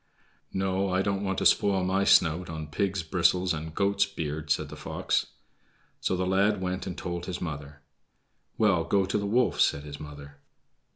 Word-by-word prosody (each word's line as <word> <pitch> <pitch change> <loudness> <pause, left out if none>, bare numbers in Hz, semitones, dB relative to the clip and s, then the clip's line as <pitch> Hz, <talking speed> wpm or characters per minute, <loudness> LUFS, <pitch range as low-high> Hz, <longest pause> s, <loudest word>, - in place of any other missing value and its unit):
"No, 95 0 0
I 95 +1 +1
don't 100 0 -1
want 95 -1 -1
to - - -1
spoil 95 -2 +4
my 95 +2 +1
snout 85 0 +4
on 80 -1 -5
pig's 95 +1 -1
bristles 90 +2 +2
and 80 0 -6
goat's 100 0 +2
beard," 80 -5 -5
said - - 0
the - - -8
fox. - - -1 0.7
So - - 0
the 90 - 0
lad 100 +2 +2
went 90 0 -3
and 90 - -5
told 85 -1 -4
his 90 -2 -4
mother. 70 -3 -6 0.7
"Well, 100 -6 +3
go 95 +3 +2
to 95 - -1
the 100 - -2
wolf," 120 +3 +2
said 70 - +2
his 70 -1 -8
mother. 70 -1 -10
90 Hz, 180 wpm, -28 LUFS, 80-95 Hz, 0.7 s, spoil